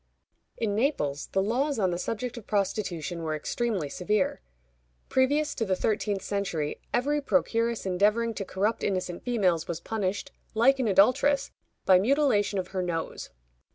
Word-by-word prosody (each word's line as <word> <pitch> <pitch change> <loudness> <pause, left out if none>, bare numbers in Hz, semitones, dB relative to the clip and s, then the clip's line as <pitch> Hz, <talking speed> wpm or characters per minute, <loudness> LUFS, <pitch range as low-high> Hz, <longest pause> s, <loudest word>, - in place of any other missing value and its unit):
In 220 -3 -1
Naples, 200 - 0
the 190 - 0
laws 270 +7 0
on 190 -4 +1
the 175 - -2
subject 230 +5 -3
of 235 -4 -10
prostitution 185 -5 -1
were 155 -1 -2
extremely 195 +1 -2
severe. 185 +6 -1 0.7
Previous 290 +4 +2
to 230 - -2
the 190 -3 +1
thirteenth 205 0 -1
century, 175 -7 -2
every 290 +4 +1
procuress 235 -5 0
endeavoring 210 +5 +2
to 205 - -4
corrupt 205 +4 -1
innocent 185 -3 -2
females 185 -9 +1
was 170 -1 -3
punished, 205 0 -3 0.2
like 265 +5 +4
an 250 - +1
adulteress, 265 +8 +3 0.3
by 185 -1 +6
mutilation 215 -4 +2
of 185 -1 -3
her 190 -1 -2
nose. 170 -2 -3
205 Hz, 150 wpm, -27 LUFS, 185-240 Hz, 0.7 s, by